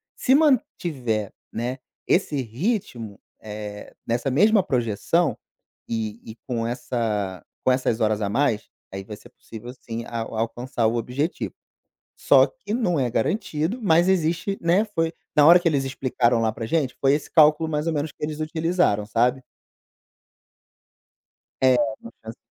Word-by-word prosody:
se 260 - +2
mantiver, 155 - +1 0.2
né, 120 +3 -3 0.3
esse 155 -6 +1
ritmo, 120 - -3 0.2
eh, 105 -1 -8
nessa 120 +4 0
mesma 205 - +4
projeção 125 - 0 0.5
e 110 -1 -3
e 110 - -9
com 115 -3 -2
essa 110 - -2 0.2
com 130 - +4
essas 125 -3 0
horas 110 -1 +1
a 100 - 0
mais, 115 -1 0 0.2
aí, 95 0 -6
vai 105 +2 -8
ser - - -16
possível 115 +2 -10
sim, 115 -2 -7
a 115 - -4
alcançar 115 +1 -2
o 115 - 0
objetivo, 130 +8 -2 0.6
só - - +5
que - - -8
não 185 -9 +1
é 125 -3 0
garantido, 165 - -1
mas 175 -2 +4
existe 175 +2 +1
né, 180 +6 +3
foi 165 -6 -1 0.2
na 150 -1 +7
hora 175 +2 +8
que 175 - +2
eles 140 -4 0
explicaram 125 -3 +1
lá 110 -1 +2
pra 115 - -6
gente, 140 -1 0
foi 135 0 +4
esse 145 - -4
cálculo 155 0 +5
mais 150 0 -2
ou 165 - +1
menos 150 0 -2
que - - -6
eles 155 0 -4
utilizaram, 160 - +1
sabe. 125 +4 +1 2.2
É, 130 -1 +6 0.3
uma 115 - -11
chance 110 +1 -9
130 Hz, 150 wpm, -24 LUFS, 115-165 Hz, 2.2 s, hora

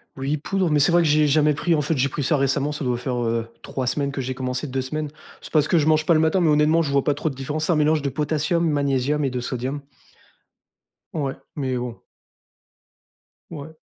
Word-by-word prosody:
Oui 140 +3 -2
poudre, 185 +2 -1
mais 150 - +3
c'est 145 +5 +4
vrai 175 0 +4
que - - +1
j'ai 150 0 +4
jamais 150 +1 +3
pris 170 +4 +1
en 150 - +1
fait 150 +2 0
j'ai 140 +1 +1
pris 145 - -3
ça 150 +2 +2
récemment 140 +2 +1
ça 150 - -4
doit 125 -2 0
faire, 125 0 -3
heu, 115 0 -1
3 130 -2 -4
semaines 140 +2 -1
que 135 - -5
j'ai 130 0 -2
commencé, 130 +1 -3
2 135 -1 -2
semaines. 150 +3 -3 0.3
C'est - - -11
parce 150 -1 +3
que 175 - +3
je 150 - +2
mange 155 0 +3
pas 170 - +5
le - - +4
matin 160 +4 +2
mais 160 - +3
honnêtement 150 +2 +4
je 145 -3 -2
vois 140 -1 +2
pas 145 - +2
trop 150 +3 -2
de 135 - -8
différence. 150 +4 -3
C'est 175 - +1
un - - +3
mélange 150 0 +2
de 140 - -1
potassium, 155 +4 0
magnésium 145 0 0
et - - +1
de 125 0 -3
sodium. 130 +3 -3 1.3
Ouais, 140 -4 -2 0.2
mais 130 -3 -2
bon. 120 -1 -5 1.5
Ouais. 160 0 -9
145 Hz, 235 wpm, -23 LUFS, 135-155 Hz, 1.5 s, pas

